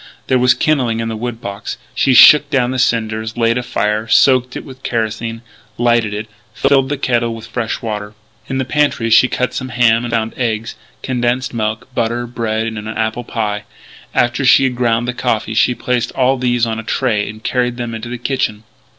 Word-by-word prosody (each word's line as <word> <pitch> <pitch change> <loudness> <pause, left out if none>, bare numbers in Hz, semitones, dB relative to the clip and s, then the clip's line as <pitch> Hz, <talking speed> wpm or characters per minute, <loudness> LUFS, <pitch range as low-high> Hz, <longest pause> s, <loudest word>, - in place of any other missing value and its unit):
There 130 - +2
was 125 +1 +4
kindling 125 -7 +1
in 115 0 -2
the 110 - -3
wood 120 +1 -5
box. 100 -2 -6 0.2
She 130 - +2
shook 150 +2 +8
down 130 -4 +1
the 130 - -2
cinders, 110 -2 -1
laid 115 +1 +2
a - - -2
fire, 105 -2 -1
soaked 125 +1 +4
it - - -6
with 130 -1 -12
kerosene, 115 -1 -3 0.3
lighted 120 -2 +2
it, 105 +1 -4 0.3
filled 135 -1 +2
the 145 - -1
kettle 120 -3 0
with 115 - -9
fresh 120 +1 -4
water. 105 -2 -5 0.3
In 135 - -2
the 130 - -1
pantry 135 -5 0
she 120 +3 +6
cut 125 0 -2
some 130 - -4
ham, 120 -1 +3
and 120 - -4
found 115 -1 -1
eggs, 115 -2 -2 0.3
condensed 125 0 -1
milk, 110 +1 -2
butter, 120 0 -1
bread, 115 -2 -2
and 110 -1 -4
an 105 - -8
apple 110 +2 -2
pie. 105 -3 -3 0.5
After 120 +3 +1
she 135 +1 +6
had 130 -2 0
ground 120 -1 +1
the 125 - -1
coffee 110 -3 -1
she 120 +3 +2
placed 120 0 -1
all 130 0 +2
these 120 -1 +1
on 110 -1 -3
a - - -6
tray 110 -2 0
and 110 +1 -10
carried 125 -1 0
them 120 -2 -4
into 115 +1 -6
the 125 - -4
kitchen. 120 -4 -2
120 Hz, 200 wpm, -17 LUFS, 110-125 Hz, 0.5 s, shook